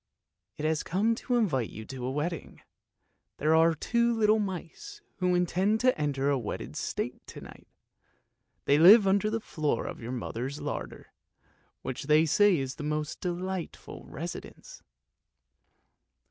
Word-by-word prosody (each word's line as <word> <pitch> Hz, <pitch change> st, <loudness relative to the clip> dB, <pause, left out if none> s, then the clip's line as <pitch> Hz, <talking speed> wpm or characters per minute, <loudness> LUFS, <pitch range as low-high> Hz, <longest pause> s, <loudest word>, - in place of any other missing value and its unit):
"It 150 Hz, -, -4 dB
has 155 Hz, -1 st, +1 dB
come 205 Hz, +6 st, +1 dB
to 245 Hz, +2 st, -2 dB
invite 150 Hz, -, +1 dB
you 110 Hz, -, -9 dB
to 130 Hz, 0 st, -6 dB
a -, -, -2 dB
wedding. 155 Hz, +4 st, -4 dB, 0.7 s
There 155 Hz, +2 st, +2 dB
are 165 Hz, +1 st, +5 dB
two 235 Hz, +9 st, +1 dB
little 220 Hz, -1 st, +3 dB
mice 205 Hz, -, -6 dB, 0.2 s
who 180 Hz, -1 st, +1 dB
intend 185 Hz, +5 st, +1 dB
to 255 Hz, 0 st, +4 dB
enter 140 Hz, -2 st, -1 dB
the 140 Hz, -2 st, +2 dB
wedded 110 Hz, -, -6 dB
state -, -, -4 dB
to -, -, -10 dB
night. -, -, -13 dB, 1.0 s
They 145 Hz, +1 st, +4 dB
live 200 Hz, +6 st, +9 dB
under 200 Hz, +2 st, +2 dB
the 225 Hz, +1 st, -1 dB
floor 150 Hz, -, -2 dB
of -, -, -7 dB
your 115 Hz, +2 st, -5 dB
mother's 130 Hz, +3 st, -4 dB
larder, -, -, -6 dB, 0.7 s
which 130 Hz, +1 st, -5 dB
they 155 Hz, +2 st, +5 dB
say 200 Hz, +4 st, +4 dB
is 135 Hz, +1 st, -4 dB
a -, -, -4 dB
most 150 Hz, 0 st, -3 dB
delightful 180 Hz, 0 st, -5 dB
residence." -, -, -8 dB
165 Hz, 145 wpm, -29 LUFS, 145-205 Hz, 1.0 s, live